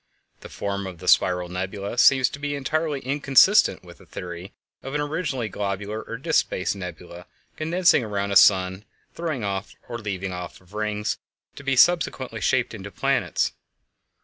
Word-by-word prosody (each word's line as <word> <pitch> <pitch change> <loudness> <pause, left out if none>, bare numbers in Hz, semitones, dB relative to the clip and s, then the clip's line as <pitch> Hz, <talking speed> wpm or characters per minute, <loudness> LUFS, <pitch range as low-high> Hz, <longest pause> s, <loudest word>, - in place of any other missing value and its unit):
The - - -11
form 100 -1 -4
of 90 -2 -8
the 90 +2 -10
spiral 90 -1 +4
nebulæ 95 +5 -4
seems 130 0 +6
to 140 - -9
be 145 0 -2
entirely 150 +1 -1
inconsistent 140 - +4
with 85 -3 -14
the - - -18
theory 90 +1 -7 0.3
of 135 +2 -6
an 150 - +1
originally 145 -6 -2
globular 100 +1 -3
or 115 - -7
disk 160 +6 +1
shaped 95 - -2
nebula 90 -1 -9 0.3
condensing 170 -2 +3
around 100 -2 -2
a - - -1
sun 95 -1 +6
and 95 +3 -12 0.3
throwing 155 -10 -3
or 100 +4 -5
leaving 95 -3 -4
off 90 -1 -7
rings, 105 0 -2 0.4
to - - -9
be 135 -1 +1
subsequently 175 +6 +2
shaped - - +1
into - - -7
planets. - - 0
105 Hz, 160 wpm, -24 LUFS, 95-140 Hz, 0.4 s, seems